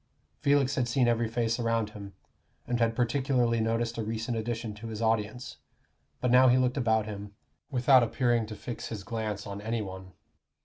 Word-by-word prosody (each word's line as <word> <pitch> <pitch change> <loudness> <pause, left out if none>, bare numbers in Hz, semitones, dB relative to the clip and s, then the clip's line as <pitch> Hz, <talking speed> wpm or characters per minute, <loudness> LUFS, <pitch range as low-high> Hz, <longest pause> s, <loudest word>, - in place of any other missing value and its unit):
Felix 140 -1 +3
had 130 -4 0
seen 120 +1 +2
every 115 -1 +2
face 115 0 -1
around 115 -2 0
him, 100 -2 -9 0.5
and 120 -1 -1
had 115 -1 +2
particularly 125 -1 +1
noticed 115 +1 -1
a - - -1
recent 115 +2 -3
addition 115 -1 -3
to 105 +2 -9
his 110 -1 -5
audience; 115 +2 -1 0.6
but 125 - +1
now 130 +1 +7
he 125 0 +5
looked 125 0 +1
about 110 -5 +2
him, 100 -1 -7 0.3
without 130 -1 +5
appearing 120 -1 +1
to 110 - -7
fix 120 +2 -6
his 105 -3 -6
glance 105 -1 -4
on 100 0 -6
any 115 +1 -2
one. 95 -1 -9
115 Hz, 180 wpm, -29 LUFS, 110-125 Hz, 0.6 s, now